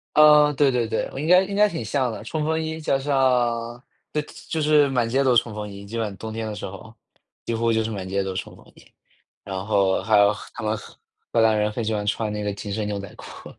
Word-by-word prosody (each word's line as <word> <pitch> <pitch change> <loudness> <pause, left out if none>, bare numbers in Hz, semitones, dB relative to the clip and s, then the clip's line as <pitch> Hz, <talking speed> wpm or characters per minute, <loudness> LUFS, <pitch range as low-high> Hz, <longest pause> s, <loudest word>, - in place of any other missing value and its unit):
嗯， 150 -1 +7
对 140 -1 +4
对 120 -2 0
对。 110 - -1
我 - - -7
应 150 - -3
该 180 +2 +6
应 195 +1 -5
该 210 +1 +5
挺 165 - -5
像 130 +3 0
的， 110 - -7
冲 150 +6 -3
锋 160 +1 0
衣 160 0 -4
加 140 -3 +1
上 125 -4 0 0.3
对， 150 - 0 0.3
就 160 - -2
是 150 -1 +4
满 125 -4 0
街 135 +4 +2
都 130 -3 +3
冲 115 -1 +2
锋 105 0 -5
衣， 100 0 -10
基 110 +4 -7
本 115 -1 0
上 100 - -7
冬 110 +2 -7
天 110 0 -4
的 110 - -4
时 105 - -6
候， 100 +3 -10 0.5
几 115 - -1
乎 115 0 +1
就 110 0 +1
是 110 - -3
满 95 -3 -5
街 100 +1 0
都 95 -1 -4
冲 95 - -6
锋 - - -18
衣。 - - -18 0.6
然 95 -1 -5
后 100 -3 +2
还 110 -2 +3
有 100 0 +5
荷 - - -10
他 - - -7
们 110 +1 0
荷 105 - -13 0.4
荷 115 - +3
兰 110 -1 +4
人 105 0 +1
很 110 +2 -4
喜 110 0 -1
欢 105 -1 -2
穿 110 0 -1
那 105 0 -3
个 105 0 -2
紧 100 +1 -6
身 105 0 -2
牛 105 -1 -3
仔 100 -1 -8
裤。 - - -11
115 Hz, 290 characters per minute, -23 LUFS, 105-135 Hz, 0.6 s, 嗯